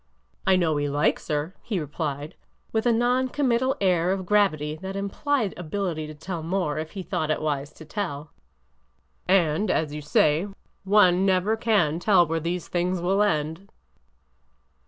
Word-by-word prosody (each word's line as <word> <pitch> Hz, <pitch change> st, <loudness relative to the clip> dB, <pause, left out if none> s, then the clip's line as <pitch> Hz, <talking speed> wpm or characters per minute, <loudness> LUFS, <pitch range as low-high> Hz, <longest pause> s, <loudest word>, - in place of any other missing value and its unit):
I 190 Hz, -, +6 dB
know 165 Hz, -4 st, +1 dB
he 145 Hz, 0 st, -1 dB
likes 145 Hz, +3 st, 0 dB
her," 150 Hz, +3 st, -2 dB
he 210 Hz, -6 st, -2 dB
replied, 150 Hz, -1 st, -4 dB, 0.4 s
with 220 Hz, +2 st, 0 dB
a -, -, +5 dB
non 245 Hz, +3 st, +2 dB
commit 255 Hz, -3 st, +1 dB
tal 260 Hz, +1 st, 0 dB
air 180 Hz, -2 st, +2 dB
of 190 Hz, -1 st, -2 dB
gravity 165 Hz, -7 st, +2 dB
that 190 Hz, +3 st, -6 dB
implied 205 Hz, +3 st, -1 dB
ability 175 Hz, -2 st, -3 dB
to 155 Hz, -, -9 dB
tell 165 Hz, +2 st, -5 dB
more 165 Hz, -3 st, -1 dB
if 155 Hz, 0 st, -6 dB
he 195 Hz, -2 st, -5 dB
thought 155 Hz, -3 st, -2 dB
it 155 Hz, -, +1 dB
wise 145 Hz, -1 st, -2 dB
to 160 Hz, -, -13 dB
tell; 155 Hz, -5 st, -4 dB, 0.5 s
'' 60 Hz, 0 st, -43 dB
and, 180 Hz, +1 st, +2 dB
as 155 Hz, -4 st, 0 dB
you 150 Hz, -, -5 dB
say, 150 Hz, +4 st, +2 dB, 0.4 s
one 190 Hz, -2 st, +5 dB
never 195 Hz, +3 st, +2 dB
can 200 Hz, -9 st, +1 dB
tell 185 Hz, -2 st, +4 dB
where 165 Hz, 0 st, -1 dB
these 170 Hz, +2 st, -3 dB
things 180 Hz, +1 st, -1 dB
will 190 Hz, +4 st, +1 dB
end." 165 Hz, -1 st, -1 dB
180 Hz, 170 wpm, -25 LUFS, 155-200 Hz, 0.5 s, I